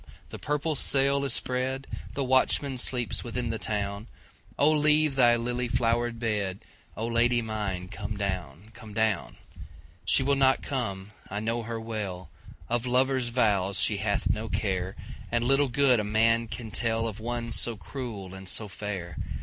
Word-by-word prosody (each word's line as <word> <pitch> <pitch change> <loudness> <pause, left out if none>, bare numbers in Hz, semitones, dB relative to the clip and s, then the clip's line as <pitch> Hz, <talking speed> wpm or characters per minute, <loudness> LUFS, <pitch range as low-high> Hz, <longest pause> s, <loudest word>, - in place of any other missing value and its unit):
the - - -8
purple 150 +2 -1
sail 140 0 +2
is 140 - -1
spread, 130 +2 -1 0.3
The 140 - 0
watchman 130 +1 +2
sleeps 125 -1 0
within 120 0 -2
the 115 - -3
town,O 105 +7 -2
leave 150 -1 +4
thy 120 -3 +6
lily 120 +1 -1
flowered 120 0 +1
bed,O 105 -1 -4
Lady 120 +1 +3
mine 105 -5 -3
come 105 +2 -5
down, 95 -1 -4
come 105 -2 -11
down! 110 - 0 0.7
She 135 - +3
will 140 +1 +2
not 135 -1 +3
come, 105 -7 -3 0.2
I 105 - -3
know 115 +2 -1
her 115 0 -4
well, 100 -6 -5 0.4
Of 120 +1 -1
lover's 130 0 +2
vows 100 -6 +2
she - - +3
hath - - 0
no 110 +1 -1
care, 95 -2 -1 0.4
And 120 0 +1
little 135 +3 +3
good 130 -1 +4
a - - 0
man 115 +2 +3
can 110 -1 -6
tellOf 115 -1 -1
one 120 +1 -3
so 115 - 0
cruel 105 -6 -6
and 95 -1 -6
so 110 - +1
fair. 95 -5 -5
115 Hz, 155 wpm, -28 LUFS, 105-125 Hz, 0.7 s, thy